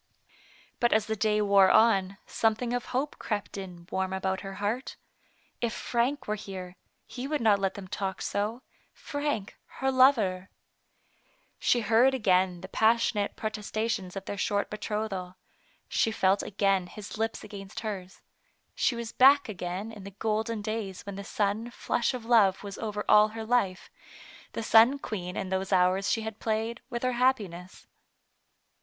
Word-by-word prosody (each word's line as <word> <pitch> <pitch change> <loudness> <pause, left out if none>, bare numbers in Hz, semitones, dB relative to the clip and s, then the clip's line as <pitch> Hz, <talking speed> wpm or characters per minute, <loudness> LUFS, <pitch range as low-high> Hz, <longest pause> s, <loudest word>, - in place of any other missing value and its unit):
But 240 - +3
as 215 -1 +3
the 220 - -2
day 210 0 +1
wore 200 -2 +6
on, 200 -4 +4
something 225 +2 0
of 245 - -2
hope 270 +4 -3
crept 210 -3 -3
in 180 -3 -8
warm 190 0 -1
about 190 0 -1
her 195 -1 -7
heart. 215 +7 -3 0.7
If 235 -1 0
Frank 250 +5 -1
were 210 - 0
here, 190 -3 -7 0.3
he 255 +1 -6
would 300 0 -1
not 215 -3 +4
let 195 -1 -1
them 195 -2 -8
talk 190 0 -3
so 215 +5 -2
— - - -38 0.2
Frank, 285 -9 -2 0.2
her 265 0 +1
lover. 220 -9 +3 1.1
She 240 - +2
heard 230 +5 +4
again 185 -6 +2
the 190 - -7
passionate 220 0 +2
protesta 215 0 -3
tions 190 -4 -4
of 195 0 -6
their 200 - -5
short 205 0 0
betrothal. 210 -4 -4 0.5
She - - +1
felt 195 -2 +2
again 195 -2 +1
his 210 +3 -9
lips 225 0 -2
against 200 -1 -8
hers. 195 -4 -6 0.5
She 245 - +1
was 235 -1 -5
back 280 +2 +6
again 190 +1 -5
in 210 -3 -10
the 200 - -7
golden 220 0 -1
days 215 -3 -4
when 200 - -6
the 200 +1 -6
sun 210 +3 -1
flush 240 +1 -1
of 240 -3 -7
love 215 -6 +4
was 200 -1 -7
over 210 -2 -3
all 210 0 +7
her 220 +1 -7
life, 220 -6 0 0.6
and 230 - -4
sun 230 +6 +6
queen 180 -9 -5
in 190 - -3
those 190 +1 -2
hours 185 +1 +3
she 225 - +1
had 220 -1 -6
played 225 +2 -2
with 240 -1 -4
her 255 - +2
happiness. 195 -9 -1
210 Hz, 165 wpm, -28 LUFS, 195-230 Hz, 1.1 s, all